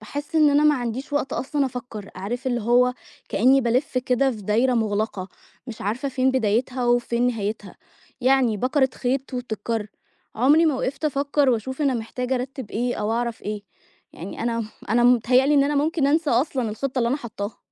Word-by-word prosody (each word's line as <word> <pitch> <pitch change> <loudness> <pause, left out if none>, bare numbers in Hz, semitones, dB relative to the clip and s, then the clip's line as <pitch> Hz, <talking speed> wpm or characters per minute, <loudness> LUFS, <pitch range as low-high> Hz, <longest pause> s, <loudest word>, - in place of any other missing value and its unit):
باحس 290 +8 -7
إن 305 -2 +5
أنا 290 +1 +3
ما 300 -1 +5
عنديش 250 +3 -4
وقت 285 -2 -1
أصلًا 280 +1 -1
أفكّر، 240 -5 -7
عارف 245 +7 -5
اللي 240 -2 0
هو 245 +3 +3 0.3
كإني 260 +6 +4
بالِف 255 +2 0
كده 255 +2 +1
في 215 -4 -7
دايرة 235 +6 +2
مغلقة، 210 -3 -1 0.4
مش 235 - -8
عارفة 235 +8 -2
فين 260 0 +1
بدايتها 250 +1 0
وفين 240 0 +2
نهايتها، 210 -4 -3 0.4
يعني 255 -4 +3
بَكَرِة 265 +4 +2
خيط 260 +1 -2
وبتتكر، 225 -2 -3 0.5
عمري 295 +8 +4
ما 300 - +2
وقفت 265 +4 -3
أفكّر 285 -1 +1
وأشوف 260 +5 -2
أنا 275 -2 +2
محتاجة 250 +3 -3
أرتّب 255 -2 -5
إيه، 245 +2 -1
أو 210 +1 -1
أعرف 235 -1 -2
إيه، 210 0 -4 0.5
يعني 185 +6 -7
أنا 230 -1 -1 0.3
أنا 240 +1 +3
متهيألي 250 +4 +4
إن 280 -1 +5
أنا 290 +1 0
ممكن 295 0 +1
أنسى 310 +1 +2
أصلًا 250 -1 +1
الخطة 260 +4 -3
اللي 235 -1 +2
أنا 265 - +1
حاطها. 210 -5 -6
250 Hz, 175 wpm, -23 LUFS, 225-270 Hz, 0.5 s, إن